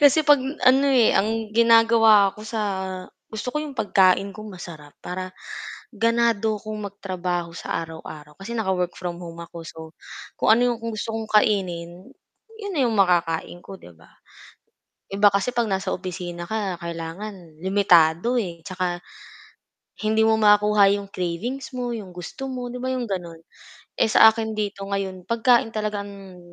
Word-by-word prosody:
Kasi 290 +2 +6
'pag 290 -2 +6 0.2
ano, 265 +2 +5
eh, 250 -4 +4
ang 220 +1 0
ginagawa 225 -3 +5
ko - - -11
sa 220 0 -3 0.7
gusto 220 +3 -5
ko 300 - -5
'yong 300 -2 -5
pagkain 195 -3 +3
ko 215 +2 -10
masarap 170 -7 -10
para 185 +1 -6 0.5
ganado 230 -2 +1
kong 210 -2 -6
magtrabaho 180 -3 -4
sa - - -5
araw-araw, 155 -2 -10
kasi 195 +4 -8
naka-work 190 -6 -1
from 175 -2 -5
home 170 -1 -9
ako, 170 0 -9
so, 160 0 -11 0.6
kung - - +4
ano 245 +2 +4
'yong - - -18
gusto 220 +1 -4
kong 225 - -3 0.2
kainin, 180 -4 -2 0.6
'yon 405 - -5
na - - +2
'yong 235 - +1
makakain 175 -3 +1
ko, 195 -1 -10
'di 85 - -15
ba. 80 - -21 1.0
Iba 200 +1 +4
kasi 200 +5 0
'pag 235 -2 0
nasa 190 -1 -1
opisina 175 -1 -5
ka, 200 -5 -3
kailangan 170 0 -7
limitado, 185 +3 +3
eh, 170 -6 -5
'tsaka 180 -1 -3 1.0
hindi 220 +1 +2
mo 220 0 +3
makuha 210 -1 +5
'yong 200 0 -2
cravings 185 +10 -3
mo, 245 -1 -2
'yong 210 -5 -6
gusto 180 +9 -7
mo, 250 -1 -5
'di 250 - -6
ba 260 - -2
'yong 255 -1 -2
gano'n, 175 -5 -5 0.6
eh, - - +4
sa 220 0 +7
akin 220 0 -4
dito 205 -2 -3
ngayon 195 -2 -4
pagkain 230 0 +2
talaga 210 -1 -2
ang 195 -2 -12
200 Hz, 160 wpm, -23 LUFS, 180-225 Hz, 1.0 s, sa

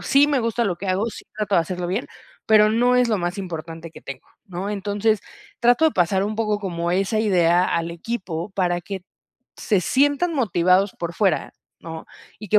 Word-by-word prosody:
Sí 280 +1 +4
me 280 -4 +1
gusta 230 +1 0
lo 190 - 0
que 195 +1 -6
hago, 195 +4 +1
sí 220 - -9
trato 210 -2 -1
de 170 - +5
hacerlo 180 +2 -4
bien, 195 +8 -2 0.4
pero 215 -1 +6
no 245 +3 +3
es 250 -1 +4
lo 215 - +2
más 175 +2 -3
importante 165 -2 -7
que - - -12
tengo, 135 -1 -9 0.2
¿no? 190 +1 -5
Entonces, 205 +1 0 0.4
trato 245 +6 +4
de 315 - +4
pasar 190 +2 +2
un 215 +1 -2
poco 215 -2 0
como 170 -4 -3
esa 195 +4 +1
idea 180 -4 +3
al 170 -1 -1
equipo 175 -3 -5
para 180 -2 0
que 190 +1 -7 0.5
se 205 -4 +1
sientan 285 - +2
motivados 190 - +2
por 170 0 -4
fuera, 190 -5 +1 0.3
¿no? 160 -1 -8 0.3
Y 210 - -8
que 210 - +5
195 Hz, 195 wpm, -22 LUFS, 175-220 Hz, 0.5 s, pero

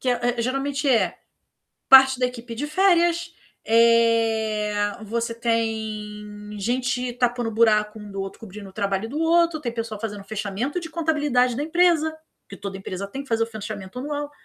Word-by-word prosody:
Que 255 - 0
é 245 0 0
é - - 0
geralmente 270 +3 -1
é 240 -4 +2 0.7
parte 265 -1 +8
da 250 - +3
equipe 240 -1 -8
de 290 +6 -3
férias, 340 0 +2 0.3
eh, 225 -2 +3 0.3
você 230 +2 -2
tem 215 -2 -3
gente 250 +3 -1
tapando 245 -1 0
buraco 215 -1 +2
um 210 -1 -10
do 195 0 -4
outro, 195 0 -7
cobrindo 205 -2 -10
o - - -18
trabalho 200 +1 -1
um - - -11
do 290 +5 -4
outro. 335 0 +3
Tem 250 -6 -3
pessoal 225 -2 -4
fazendo 205 -2 -5
fechamento 215 - -3
de 330 -2 -8
contabilidade 295 -7 +1
da 285 - -2
empresa, 320 -1 +2 0.3
que 200 - -9
toda 195 -1 -6
empresa 195 0 -5
tem 270 +8 -6
que 280 - -18
fazer 225 0 +2
o - - -4
fechamento 215 0 -7
anual. 290 +1 -4
230 Hz, 175 wpm, -23 LUFS, 210-275 Hz, 0.7 s, parte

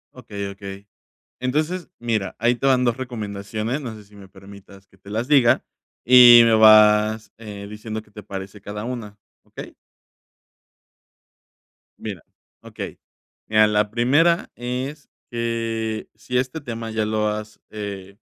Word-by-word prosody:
Okey, 105 -5 -6
okey, 100 0 -10 0.5
entonces 155 +8 -2
mira, 115 -4 -2
ahí 120 +2 +2
te 125 - -2
van 130 -2 +4
2 120 -2 +1
recomendaciones, 110 +1 -4
no 120 -4 -6
sé, 105 -1 -13
si, 105 +1 -20
me 100 -1 -13
permitas 100 0 -15
que 95 - -25
te 100 +1 -15
las 115 +4 -3
diga 135 -5 +4 0.4
y 120 -1 +9
me 115 - +4
vas, 110 0 +5
eh, 105 -3 -9
diciendo 110 +1 -6
que 105 - -22
te 105 +1 -11
parece 95 0 -8
cada 105 +1 -6
una, 115 -4 -6 0.2
okey. - - -11 2.2
Mira, - - -7 0.4
okey, - - -8 0.5
mira, 110 0 +4
la 105 0 +1
primera 145 +9 +2
es 130 +4 -5 0.2
que 115 -2 -3
si 110 +4 -3
este 130 +5 -2
tema 115 -5 -6
ya 110 -1 -1
lo 110 0 0
has, 105 0 -5
eh, 100 -2 -7
110 Hz, 140 wpm, -22 LUFS, 105-120 Hz, 2.2 s, y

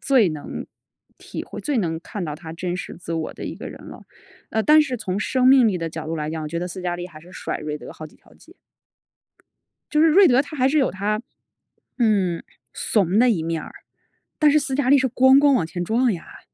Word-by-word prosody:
最 255 -8 +4
能 155 -2 -6 0.5
体 - - -7
会 - - -8
最 290 -4 -1
能 165 -5 -2
看 185 +2 -6
到 150 -2 -4
她 160 0 -9
真 175 +2 -3
实 - - -7
自 170 -1 -7
我 160 -1 -3
的 - - -8
一 - - -5
个 - - -8
人 - - -11
了。 - - -11 0.5
呃， 220 - 0
但 305 +3 +6
是 260 -4 -3
从 190 -3 -3
生 255 +3 +1
命 260 -3 +7
力 190 -4 -1
的 165 -1 -3
角 160 0 -7
度 165 - -3
来 150 -1 -3
讲， 160 0 -4
我 150 - -4
觉 170 +2 -3
得 180 - -3
斯 180 +1 -7
嘉 175 -1 -2
丽 175 0 -5
还 155 -3 -13
是 175 - -16
甩 - - -5
瑞 150 0 -5
德 - - -10
好 155 - -10
几 - - -23
条 - - -23
街。 - - -19 1.4
就 300 - +3
是 325 - +6
瑞 370 +4 +6
德 255 +2 +4
他 290 +1 -9
还 260 0 +3
是 305 +3 +2
有 270 - +2
他， 210 +3 -2 0.8
嗯， 200 -7 +1 0.3
怂 195 -2 +1
的 245 +1 +5
一 180 -8 0
面 165 -1 -2
儿， - - -10 0.7
但 300 -1 +5
是 305 - +4
斯 275 -2 -2
嘉 270 -2 0
丽 280 - +7
是 260 0 +1
咣 260 +2 +5
咣 285 0 +5
往 185 -11 +2
前 175 +2 -4
撞 235 +3 +2
呀。 170 - -9
200 Hz, 260 characters per minute, -22 LUFS, 165-260 Hz, 1.4 s, 命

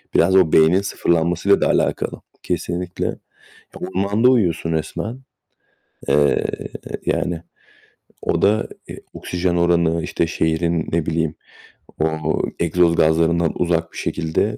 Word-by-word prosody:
biraz 95 - +4 0.2
beynin 80 +5 +5
sıfırlanmasıyla 85 0 +1
da - - +3
alakalı. - - 0 0.2
Kesinlikle. 90 +1 -3
Ya, - - -2 0.6
ormanda 100 +6 +1
uyuyorsun 85 -8 +1
resmen, 85 +9 -3 0.9
eee, 75 -1 +3 0.6
yani 85 -2 -1 0.8
o - - -1
da, 105 +2 +2 0.2
eee, - - -8
oksijen 90 0 -2
oranı, 85 -1 +2
işte, 85 - -1
şehrinin, 80 +1 0
ne 85 -1 0
bileyim, 80 -1 -1 0.6
o 80 0 0 0.2
egzoz 85 0 +3
gazlarından 80 +1 +2
uzak 85 -1 0
bir - - -10
şekilde. 80 -1 -1
85 Hz, 110 wpm, -20 LUFS, 80-90 Hz, 0.9 s, beynin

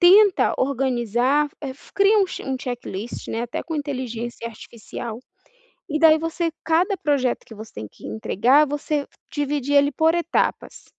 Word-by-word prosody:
tenta 385 +2 +6
organizar, 260 +1 +1
eh, 275 -3 -4
fa - - -20
cria 405 +2 +5
um 390 - +4
che - - -7
um 265 -1 -2
checklist, 240 -4 -5
né, 225 +1 -2
até 240 - -4
com 325 -2 -4
inteligência 240 -5 -4
artificial, 230 +1 -8 0.7
e 305 -1 -1
daí 315 -1 +6
você 330 +1 -1
cada 355 +5 +2
projeto 280 -7 0
que 225 - -12
você 220 +1 -10
tem 105 0 -6
que - - -12
entregar 235 - +3
você 295 0 -2 0.3
dividir 285 -1 -1
ele 285 0 +5
por 320 +3 +2
etapas. 345 0 -1
280 Hz, 160 wpm, -23 LUFS, 240-320 Hz, 0.7 s, tenta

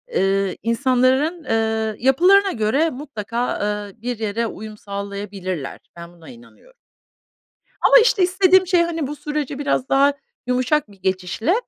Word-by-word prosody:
ııı, 195 -1 +1
insanların, 260 - +1
ııı, 220 -2 -1
yapılarına 365 +10 +4
göre 255 +8 +1
mutlaka, 245 -4 -4
ııı, 205 0 -4
bir 245 -1 -4
yere 225 +1 -2
uyum 215 -1 -9
sağlayabilirler. 200 -6 -6 0.2
Ben, 170 0 -11
buna 170 -2 -15
inanıyorum. 255 - -17 1.1
Ama, - - +6
işte, 455 -4 +3
istediğim 370 +1 +4
şey, 355 -1 +3
hani, 330 -4 -2
bu 295 - -6
süreci 295 -2 -4
biraz 280 -2 -1
daha 280 +1 +4 0.3
yumuşak 250 +1 0
bir 200 - -18
geçişle, 190 - -1
245 Hz, 135 wpm, -21 LUFS, 205-300 Hz, 1.1 s, Ama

